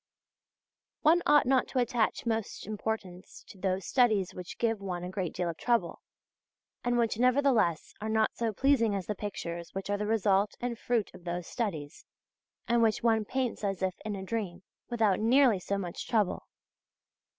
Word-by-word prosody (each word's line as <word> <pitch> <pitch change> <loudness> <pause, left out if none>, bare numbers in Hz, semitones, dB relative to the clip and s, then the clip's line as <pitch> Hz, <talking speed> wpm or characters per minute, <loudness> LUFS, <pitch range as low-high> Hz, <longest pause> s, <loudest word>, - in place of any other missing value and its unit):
{II} - - -63
One 325 +3 +5
ought 295 0 +6
not 260 0 +3
to - - -5
attach 240 -2 +1
most 225 -2 -2
importance 205 -3 -5
to 195 - -13
those 185 -1 -1
studies 215 -3 +2
which 180 -1 -8
give 225 -3 0
one 180 -3 -4
a 180 - -5
great 185 -3 -2
deal 175 - -2
of 165 -1 -4
trouble, 240 -1 0 0.8
and 245 0 +1
which 230 -2 +1
nevertheless 250 - +2
are 215 - -3
not 220 0 +1
so 230 -1 -1
pleasing 230 -2 +2
as 190 -2 -3
the 210 - -2
pictures 170 -5 -6
which 195 +1 -3
are 205 - +1
the 210 - -1
result 205 -2 +2
and 240 -1 -3
fruit 235 -4 -1
of - - -13
those 175 0 -3
studies, 165 - -4 0.6
and 235 0 +3
which 220 -1 +2
one 225 -2 +3
paints 255 -1 -2
as 195 -2 -1
if 185 -1 +1
in 215 -1 -3
a 190 - -6
dream, 190 -4 -4 0.3
without 220 -5 +2
nearly 235 -1 +4
so 200 +2 -2
much 180 -3 -5
trouble. 215 -6 0
215 Hz, 180 wpm, -30 LUFS, 190-235 Hz, 0.8 s, ought